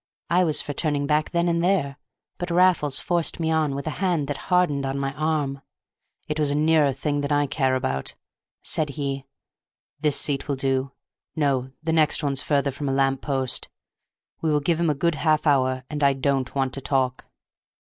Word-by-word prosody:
I 180 +2 +4
was 155 -4 +1
for 145 - -5
turning 145 -1 -1
back 150 +1 +1
then 170 0 +1
and 170 0 +1
there, 165 -7 +1 0.4
but 175 - -3
Raffles 170 -5 +3
forced 175 +1 0
me 160 -1 0
on 155 -3 +1
with 140 - -5
a 155 - -2
hand 175 -7 +1
that 145 - -2
hardened 180 -6 +2
on 135 0 -2
my 135 0 -2
arm. 145 -2 -1 0.7
"It 150 0 -3
was 150 -2 +2
a 145 - 0
nearer 155 -1 +3
thing 145 +2 -2
than 145 +1 -3
I 145 0 +3
care 135 -2 +1
about," 65 - -2 0.5
said 155 -2 0
he. 135 -2 -3 0.7
"This 150 -2 +2
seat 140 -1 -1
will 140 - 0
do; 135 0 -1 0.4
no, 135 -4 0
the 160 0 0
next 160 -1 +3
one's 140 -2 0
further 140 -1 +1
from 140 +1 -4
a - - 0
lamp 135 0 +1
post. 135 -3 -1 0.7
We 160 - 0
will 150 - +3
give 160 +3 0
him 170 -1 +2
a 150 - +1
good 170 +4 +1
half 155 0 +1
hour, 130 -3 +2
and 150 -1 -3
I 140 0 +5
don't 135 -1 -1
want 135 -2 0
to 135 - -4
talk." 130 -2 -1
145 Hz, 195 wpm, -24 LUFS, 135-155 Hz, 0.7 s, I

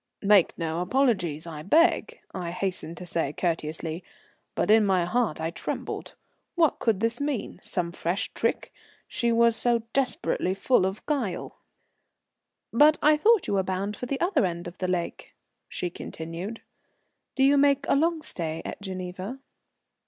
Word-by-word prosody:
"Make 200 -3 +4
no 165 -1 -2
apologies, 185 - +1
I 160 -3 -7
beg," 330 - +2
I 180 -2 -4
hastened 180 -2 -3
to 180 - -7
say 165 -4 -1
courteously. 165 0 -3 0.5
But - - +2
in 220 0 +6
my 190 -3 +2
heart 225 -3 0
I 160 +1 -2
trembled. - - -5 0.4
What 330 -4 +3
could 215 -4 +1
this 230 +3 0
mean? 285 -5 -3
Some 175 -3 -3
fresh 170 +3 -2
trick? - - -1 0.3
She 235 -1 0
was 230 0 +4
so 235 -1 +2
desperately 250 -8 0
full 195 -1 +3
of 190 +2 -6
guile! 265 - -2 1.1
"But 300 +6 +6
I 300 +1 +6
thought 430 +6 +4
you - - -2
were 195 - +3
bound 190 +2 -2
for 250 - -6
the 270 +1 -2
other 345 - +2
end 175 -1 -2
of 175 - -10
the 185 - -1
lake," 180 -2 -3 0.3
she 180 - -3
continued. 170 +8 -7 0.7
"Do 265 - +2
you 275 +1 +6
make 280 0 +3
a - - +3
long 320 +2 +1
stay 165 - -3
at - - -6
Geneva?" 185 +4 -5
195 Hz, 160 wpm, -26 LUFS, 175-260 Hz, 1.1 s, in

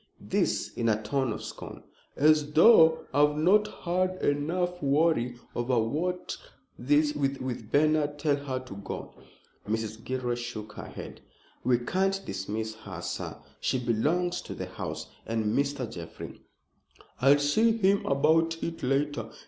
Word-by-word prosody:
This - - -1
in 115 -1 0
a 110 -1 +2
tone 125 +3 -1
of 110 - -5
scorn. - - -8 0.3
"As 150 0 +3
though 160 -2 +7
I've 150 +1 +3
not 200 +7 +4 0.2
had 185 +1 0
enough 175 +5 0
worry 140 -4 +2 0.2
over 120 +1 0 1.1
that 150 +1 +3 0.2
with 120 -4 -5
Bernard. 150 0 +2
Tell 145 -1 +2
her 140 -2 -4
to 130 -6 -10
go." 100 - -7 0.6
Mrs. 110 0 -3
Gilroy 130 -1 -2
shook 120 -3 -6
her - - -8
head. - - -9 0.4
"We 125 -1 +3
can't 190 +10 0
dismiss 110 +3 -4
her, 95 -5 -8
sir. - - -4 0.2
She - - 0
belongs 150 +10 0
to - - -8
the - - -4
house, - - -6 0.2
and 110 -1 0
Mr. 140 -3 0
Jeffrey" 85 -6 -9 0.8
"I'll 140 +2 +6
see 215 +11 +3
him 200 -1 +3
about 160 +4 +3
it 165 0 -4
later. 135 -3 0
145 Hz, 140 wpm, -28 LUFS, 120-160 Hz, 1.1 s, though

